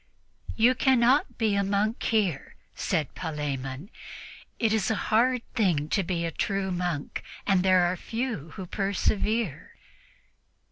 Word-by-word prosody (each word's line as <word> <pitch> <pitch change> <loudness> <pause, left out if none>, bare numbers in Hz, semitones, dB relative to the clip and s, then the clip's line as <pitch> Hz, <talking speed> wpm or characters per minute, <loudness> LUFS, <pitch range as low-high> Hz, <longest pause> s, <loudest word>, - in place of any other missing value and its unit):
"You 235 +3 +5
cannot 260 +1 +3
be 220 -3 +1
a 200 0 +2
monk 205 +3 0
here," 200 -10 0 0.2
said 155 -6 -1
Palemon. 145 - -4 0.7
"It 225 -2 +1
is 215 -5 +1
a 220 - +1
hard 235 +4 +2
thing 165 -9 +1
to 195 - +2
be 170 -2 -2
a 165 - -2
true 195 +3 -1
monk, 175 -5 -3 0.2
and 195 -3 +3
there 180 -1 +4
few 225 - -4
who 190 - -6
persevere." 200 -1 -1
195 Hz, 130 wpm, -27 LUFS, 170-220 Hz, 0.7 s, You